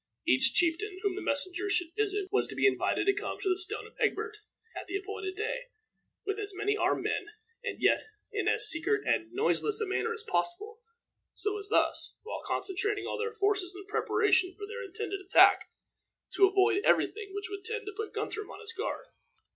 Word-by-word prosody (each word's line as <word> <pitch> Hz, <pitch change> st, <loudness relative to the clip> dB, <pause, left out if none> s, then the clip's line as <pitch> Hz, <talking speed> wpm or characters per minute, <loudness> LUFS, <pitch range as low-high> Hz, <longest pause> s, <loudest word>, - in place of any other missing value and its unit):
Each 130 Hz, -, +4 dB
chieftain 355 Hz, +4 st, +1 dB
whom 400 Hz, -2 st, +1 dB
the 400 Hz, -, -5 dB
messengers 370 Hz, +8 st, 0 dB
should 355 Hz, -2 st, 0 dB
visit 415 Hz, -2 st, 0 dB
was 415 Hz, -, +2 dB
to -, -, -7 dB
be -, -, +2 dB
invited 405 Hz, -, +2 dB
to 395 Hz, -, +4 dB
come -, -, -4 dB
to 385 Hz, -, -1 dB
the 365 Hz, -, +3 dB
Stone 365 Hz, -, 0 dB
of -, -, -14 dB
Egbert 430 Hz, +1 st, 0 dB, 0.4 s
at -, -, -6 dB
the 395 Hz, -, -1 dB
appointed 390 Hz, -1 st, -5 dB
day, -, -, -3 dB, 0.6 s
with 400 Hz, +1 st, -2 dB
as 410 Hz, -2 st, -5 dB
many 415 Hz, +2 st, 0 dB
armed -, -, +1 dB
men, 410 Hz, -, -1 dB, 0.4 s
and -, -, -4 dB
yet -, -, +3 dB, 0.3 s
in -, -, -1 dB
as -, -, +3 dB
secret 400 Hz, +6 st, +2 dB
and 335 Hz, 0 st, 0 dB
noiseless 425 Hz, +2 st, +2 dB
a 440 Hz, -, 0 dB
manner 420 Hz, +3 st, -1 dB
as 450 Hz, -1 st, -3 dB
possible, 430 Hz, +1 st, -1 dB, 0.6 s
so 415 Hz, 0 st, 0 dB
as 405 Hz, -, -4 dB
thus, -, -, +2 dB
while 440 Hz, -, -5 dB
concentrating 410 Hz, +2 st, -1 dB
all -, -, -3 dB
their 455 Hz, 0 st, -1 dB
forces 395 Hz, -3 st, 0 dB
in 395 Hz, +1 st, -9 dB
preparation 375 Hz, -2 st, +2 dB
for 410 Hz, -, -6 dB
their 455 Hz, +3 st, -6 dB
intended 395 Hz, +1 st, -4 dB
attack, 380 Hz, -, +6 dB, 0.6 s
to 390 Hz, -, +6 dB
avoid 395 Hz, +1 st, +3 dB
every -, -, +5 dB
thing 420 Hz, -2 st, -9 dB
which 405 Hz, +1 st, -4 dB
would 400 Hz, -1 st, -6 dB
tend 450 Hz, +1 st, -3 dB
to 415 Hz, -, -6 dB
put 440 Hz, +1 st, -4 dB
Guthrum 430 Hz, -1 st, -4 dB
on -, -, -9 dB
his 450 Hz, +1 st, -5 dB
guard. 460 Hz, +3 st, -4 dB
405 Hz, 200 wpm, -30 LUFS, 380-430 Hz, 0.6 s, attack